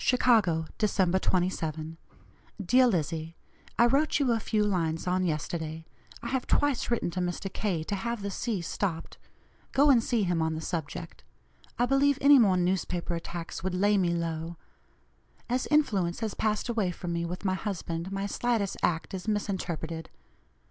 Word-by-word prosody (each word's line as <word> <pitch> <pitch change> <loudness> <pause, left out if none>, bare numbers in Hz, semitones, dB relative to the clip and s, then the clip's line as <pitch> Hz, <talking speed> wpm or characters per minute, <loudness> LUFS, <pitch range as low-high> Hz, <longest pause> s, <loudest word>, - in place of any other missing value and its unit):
"CHICAGO, 215 -11 +3
December 190 -4 +2
27. 165 -4 -1 0.7
"DEAR 255 +7 +5
LIZZIE: 165 -4 -1 0.4
I 235 - +6
wrote 280 +6 +3
you 270 -4 +2
a 230 - +2
few 215 0 0
lines 165 -5 0
on 185 +1 +1
yesterday. 160 0 -3 0.4
I 235 - -3
have 265 -1 -1
twice 290 -4 +1
written 235 -7 0
to 185 - -3
Mr. 180 +2 -3
K. 180 -7 -1
to 205 - -4
have 230 +2 -3
the 200 - -3
C. 210 -1 -2
stopped. 170 0 -3 0.5
Go 285 +1 +6
and 235 -4 +4
see 230 -3 +1
him 175 -3 +1
on 160 0 0
the - - -3
subject. 155 - -5 0.5
I 245 - +3
believe 275 +2 +3
any 280 0 +7
more 195 -6 +4
newspaper 180 -1 -1
attacks 170 +1 -5
would 185 -1 -1
lay 205 +3 +3
me 185 -3 +2
low 165 0 -3 0.9
As 250 +1 -1
influence 205 - +1
has 220 -2 -2
passed 215 +1 -1
away 225 -6 0
from 175 0 -4
me 170 0 -1
with 180 +3 -5
my 190 - +2
husband, 185 -3 -4
my 195 0 -2
slightest 220 -2 -1
act 165 +1 0
is 190 +2 -5
misinterpreted. 170 -6 -3
185 Hz, 165 wpm, -28 LUFS, 170-225 Hz, 0.9 s, any